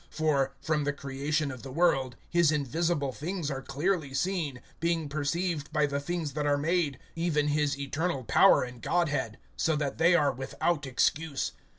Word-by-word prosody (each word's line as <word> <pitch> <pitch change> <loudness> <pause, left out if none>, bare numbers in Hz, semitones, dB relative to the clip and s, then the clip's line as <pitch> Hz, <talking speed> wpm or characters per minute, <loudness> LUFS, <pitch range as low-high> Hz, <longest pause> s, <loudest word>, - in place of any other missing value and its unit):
(20)For, 145 -4 +2
from 155 0 0
the 145 0 0
creation 140 +2 -2
of 130 -3 -8
the 135 - -8
world, 135 -5 +2
his 170 -2 +3
invisible 150 0 0
things 160 +2 -3
are 135 -1 -3
clearly 145 +1 -1
seen, 165 -7 -1 0.2
being 165 -2 0
perceived 155 +2 -2
by 150 -1 +2
the 140 -1 -1
things 160 -1 -3
that 150 0 -1
are 145 0 +3
made, 155 -2 0 0.2
even 155 -3 +1
his 145 -1 +1
eternal 140 +1 -2
power 115 - +5
and 125 -2 -8
Godhead; 145 -10 0 0.2
so 160 - +1
that 145 -1 -2
they 170 +2 +5
are[1:20] 145 -6 +3
without 145 +3 -1
excuse. 140 +3 0
150 Hz, 170 wpm, -29 LUFS, 140-165 Hz, 0.2 s, power